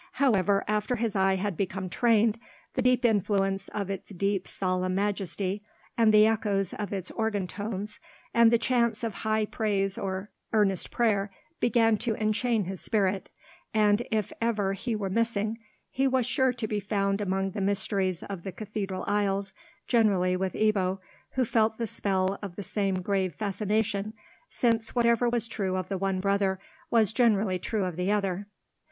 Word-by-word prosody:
However 205 -7 +3
after 210 +3 0
his 225 -2 -2
eye 190 0 +3
had 195 0 -2
become 190 +1 -2
trained, 225 +3 +2 0.3
the 260 - 0
deep 250 0 +3
influence 195 -3 +1
of 200 -2 -4
its 195 - -6
dim 195 0 0
solemn 185 -1 -1
majesty, 195 0 -1 0.3
and 230 -1 +3
of - - +7
the 215 0 +7
echoes 205 -4 0
of 210 -3 -4
its 190 -3 -3
organ 220 -4 -1
tones, 205 +2 -5 0.3
and 235 -1 +6
chants 235 -2 +1
of 225 -2 -1
high 215 0 +1
praise 200 -3 -1
or 190 +1 -4 0.2
earnest 200 -4 +2
prayer, 215 -4 +1 0.3
began 225 -2 +3
to 225 +1 -1
enchain 220 +1 +1
his 190 0 -5
spirit; 195 -3 0 0.5
and, 210 0 +4
if 215 -4 -1
ever 210 -4 +1
he 225 +4 -3
were 200 -3 -3
missing, 225 0 0 0.3
he 270 +1 +1
was 260 -2 +2
sure 260 +1 +2
to 240 -3 -4
be 210 -1 -1
found 200 0 0
among 195 0 -1
the 200 - -4
mysteries 195 -2 0
of 195 -3 -6
the 190 - -5
cathedral 200 -2 -4
aisles, 200 -1 0 0.3
generally 195 -6 +3
with 185 0 -2
Ebbo, 195 -3 +1 0.4
who 260 -1 +1
felt 220 -1 +2
the 235 - -1
spell 195 -2 -1
of 195 -4 -6
the 205 - -5
same 195 -2 -1
grave 190 -4 0
fascination, 210 +1 -1 0.3
since 230 -1 0
whatever 235 0 +3
was 235 -1 0
true 195 -4 -2
of 185 -1 -4
the 195 - -1
one 195 -1 0
brother 195 -1 +1 0.3
was 220 -3 +3
generally 215 -6 +2
true 210 +2 -1
of 180 -3 -4
the 180 +2 0
other. 200 -1 -1
205 Hz, 170 wpm, -28 LUFS, 195-220 Hz, 0.5 s, of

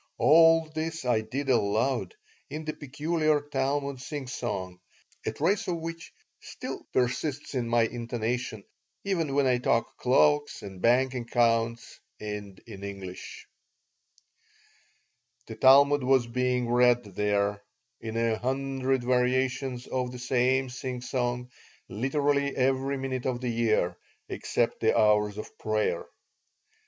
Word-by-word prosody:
All 165 +1 +6
this 160 -1 -3
I 120 -3 +2
did 130 +6 -4
aloud, 120 - +1 0.3
in 155 +1 -6
the 155 - -2
peculiar 155 +2 0
Talmud 140 -1 -2
singsong, 120 - -5 0.5
a - - +1
trace 200 +2 0
of 180 - 0
which 165 0 -7 0.3
still - - -8
persists 135 +4 -1
in 120 -3 -1
my 120 0 +4
intonation 115 -1 -3 0.4
even 165 -8 -1
when 140 -1 +3
I 125 -1 +3
talk 115 -1 0
cloaks 145 +3 +2
and 95 -2 -9
bank 125 +3 +3
accounts 115 -1 0 0.2
and 105 -2 -6
in 100 -4 -10
English 95 -2 -8 2.0
The - - -8
Talmud 140 +3 +6
was 130 -1 +3
being 125 +1 0
read 120 0 +4
there, 100 0 -1 0.4
in 110 0 -5
a 115 -1 +1
hundred 135 0 -1
variations 125 0 0
of 125 -1 -2
the 125 - -8
same 130 +1 +1
singsong, 125 -1 -3 0.4
literally 140 +5 0
every 135 +1 +1
minute 130 -1 -3
of 125 -2 -1
the 125 -1 -3
year, 110 -7 +1 0.3
except 120 - -1
the 110 - +2
hours 105 -1 +3
of 110 - -9
prayer. 110 0 -1
125 Hz, 125 wpm, -28 LUFS, 115-135 Hz, 2.0 s, All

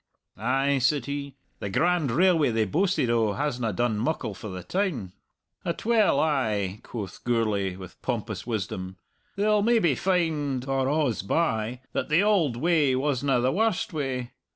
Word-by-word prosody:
"Ay," 135 +5 +1
said 130 0 +2
he, 140 -1 -5 0.2
"the 100 - -4
grand 170 - +2
railway 165 +2 +3
they 110 -1 +1
boasted 180 - +1
o' 110 -3 +2
hasna 125 -5 -1
done 110 +1 0
muckle 120 -4 -1
for 105 +2 -8
the 90 -1 -6
town!" 150 - -2 0.5
"Atwell 215 -2 +2
ay," 110 -10 0
quoth 105 -5 -7
Gourlay 105 -6 0
with 95 -1 -11
pompous 110 -5 -3
wisdom; 95 -4 -4 0.4
"they'll 210 +1 +2
maybe 220 -8 +3
find, 150 -6 0
or 135 -1 +1 0.2
a's 115 - -2
by, 115 - -1
that - - -2
the 160 +6 +4
auld 175 - +2
way 150 -3 +3
wasna 135 -1 +1
the 130 +2 +2
warst 215 -2 0
way. 130 -5 -3
130 Hz, 150 wpm, -26 LUFS, 110-160 Hz, 0.5 s, the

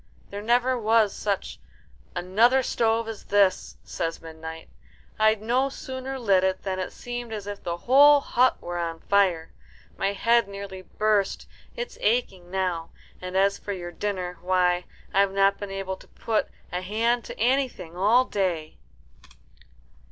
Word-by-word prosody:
"There 200 +1 -5
never 245 +3 +2
was 220 -2 +3
such 200 -2 -3 0.6
another 230 +9 +3
stove 225 -1 +1
as 225 -2 -7
this," 200 -2 +2
says 165 0 -3
Midnight. 160 0 -9 0.5
"I'd 215 -1 +3
no 255 +4 +1
sooner 265 -1 -6
lit 200 -7 +3
it 190 0 0
than 190 -1 -2
it 185 - -3
seemed 240 -1 -6
as 210 -2 -5
if 205 0 -6
the 170 0 -3
whole 285 +8 +6
hut 255 -2 +2
were 175 0 -5
on 165 -1 -3
fire. 185 -5 +1 0.5
My 195 +1 +1
head 230 +2 +3
nearly 200 -1 -7
burst. 210 0 0 0.3
It's 485 -1 -6
aching 200 -6 0
now; 180 -3 -2 0.3
and 185 +1 -3
as 195 +1 +3
for 205 - -4
your 175 -2 -6
dinner, 180 -3 -4
why, 180 -1 +2 0.3
I've 195 0 +3
not 195 0 +3
been 205 - -5
able 195 -1 -4
to - - -17
put 220 -2 -1 0.2
a 180 - -2
hand 230 +5 0
to - - -9
anything 245 -8 0
all 220 +8 +4
day." 180 -8 -2
200 Hz, 150 wpm, -25 LUFS, 185-230 Hz, 0.6 s, whole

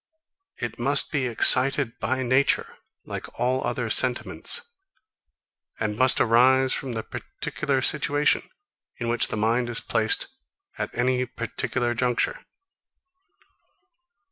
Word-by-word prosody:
It - - -6
must - - +4
be 140 -4 -1
excited 130 +2 +3
by 130 0 -2
nature, 130 +3 +1 0.3
like - - -8
all 130 +2 0
other 125 -3 -2
sentiments; 130 - +1 1.1
and 105 -1 -2
must 130 +3 +4
arise 130 +3 +3
from 130 -3 -3
the 110 -1 -4
particular 140 -3 -4
situation, 145 +1 +1 0.5
in 120 -1 -4
which 120 - +3
the - - -5
mind 115 +3 0
is 120 - 0
placed 110 -1 0 0.5
at - - -2
any 125 +1 0
particular 120 0 -3
juncture. 125 0 -1
125 Hz, 115 wpm, -24 LUFS, 120-130 Hz, 1.1 s, must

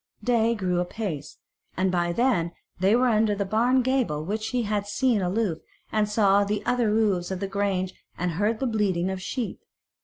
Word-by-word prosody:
Day 235 -1 +2
grew 180 -4 0
apace, 180 -5 -4 0.4
and 185 +1 +2
by 175 -1 +1
then 175 -6 +1 0.3
they 195 +4 +4
were 250 +1 +3
under 215 -2 +3
the 200 0 -1
barn 240 +6 +2
gable 240 - 0
which 215 +4 -2
he 245 0 -1
had 205 -1 -1
seen 230 0 +1
aloof 185 -2 0 0.3
he 215 -1 +2
saw 205 -1 +3
the 205 +1 -2
other 245 -3 +2
roofs 205 -5 +1
of 190 -1 -3
the 195 - -2
grange 195 -2 -1 0.2
and 180 0 -1
heard 210 +6 0
the 270 - -1
bleating 195 -6 0
of 190 -1 -5
sheep. 235 +3 -4
205 Hz, 185 wpm, -26 LUFS, 185-225 Hz, 0.4 s, they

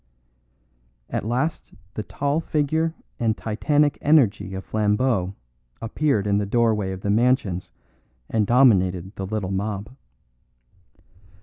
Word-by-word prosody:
At - - -2
last 130 - -2 0.2
the - - -3
tall 140 +7 -1
figure 160 +1 0 0.2
and 110 -2 +1
titanic 145 +7 +1
energy 110 - +3
of 95 - -6
Flambeau 105 -2 0 0.4
appeared 115 -1 0
in 100 0 +2
the 105 - -1
doorway 110 -3 +1
of 95 0 -6
the 100 - 0
mansions 110 -5 +1 0.6
and 110 -3 0
dominated 95 -7 +3
the 95 - -5
little 100 -2 -3
mob. 100 +3 -3
110 Hz, 115 wpm, -23 LUFS, 100-130 Hz, 0.6 s, energy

